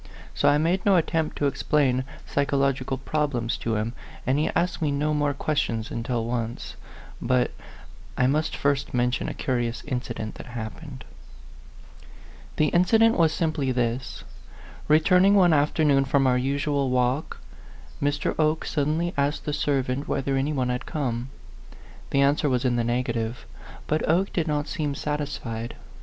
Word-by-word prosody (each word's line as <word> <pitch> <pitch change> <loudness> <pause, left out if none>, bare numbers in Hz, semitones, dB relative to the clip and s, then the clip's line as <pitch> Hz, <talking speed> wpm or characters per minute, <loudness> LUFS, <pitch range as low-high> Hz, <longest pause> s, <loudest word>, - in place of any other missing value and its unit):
So - - +3
I 145 - +4
made 170 +5 +1
no 200 -2 +4
attempt 160 -2 0
to 145 - 0
explain 135 -2 +1 0.2
psychological 135 -2 0
problems 135 -5 -1
to 115 -1 -2
him, 110 +2 -2 0.3
and 130 +3 +2
he 155 - +1
asked 175 0 0
me 155 - +1
no 150 +2 0
more 145 -1 0
questions 120 -7 -1
until 115 0 -2
once 120 0 -4 0.5
But 125 0 +1 0.7
I 125 - +3
must 150 +4 +1
first 140 -2 0
mention 125 +1 0
a - - -6
curious 120 -2 -2
incident 120 -5 -4
that - - -13
happened. 125 +4 -7 1.5
The 155 -1 +2
incident 225 +6 +4
was 165 -2 +4
simply 155 -6 0
this. 125 0 -2 0.6
Returning 180 +6 +5
one 180 -4 +5
afternoon 145 -2 +3
from 135 0 +2
our 125 -1 +4
usual 140 +1 0
walk, 125 +3 0 0.6
Mr. 145 0 0
Oke 155 0 +2
suddenly 160 +4 0
asked 140 +2 0
the 150 - -2
servant 140 -2 -1
whether 135 0 -1
any 135 +3 0
one 130 -4 0
had 125 +1 -3
come. 130 -5 -2 0.8
The 140 - +2
answer 145 +1 +3
was 125 -1 0
in 125 -1 +2
the 120 - +1
negative; 120 - -2 0.4
but 155 +1 0
Oke 185 +5 +2
did 165 -2 0
not 150 -1 -1
seem 145 -2 -2
satisfied. 135 -7 -4
140 Hz, 150 wpm, -25 LUFS, 125-150 Hz, 1.5 s, Returning